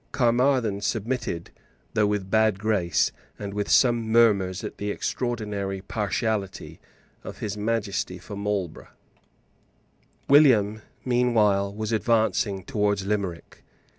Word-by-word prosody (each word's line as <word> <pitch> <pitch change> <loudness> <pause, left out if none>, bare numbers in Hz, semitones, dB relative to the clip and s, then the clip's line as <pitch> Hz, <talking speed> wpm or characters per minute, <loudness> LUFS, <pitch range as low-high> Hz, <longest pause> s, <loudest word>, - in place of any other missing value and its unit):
Caermarthen 120 -4 +2
submitted, 110 -4 -3 0.4
though 105 -1 +3
with 105 -1 -1
a - - -12
bad 110 0 +2
grace, 100 -5 +1 0.3
and 100 -1 -6
with 105 0 -3
some 120 -3 +3
murmurs 100 -5 +3
at - - -7
the 105 - -3
extraordinary 105 -4 -3
partiality 105 0 -3 0.4
of - - -8
His 105 -1 -4
Majesty 105 -4 -2
for 100 +4 -9
Marlborough, 100 -4 -3 1.4
William 115 -8 +5 0.2
meanwhile 110 -6 +2
was 110 +1 -4
advancing 110 -3 +1
towards 105 -5 0
Limerick. 100 -5 -4
105 Hz, 110 wpm, -25 LUFS, 100-115 Hz, 1.4 s, William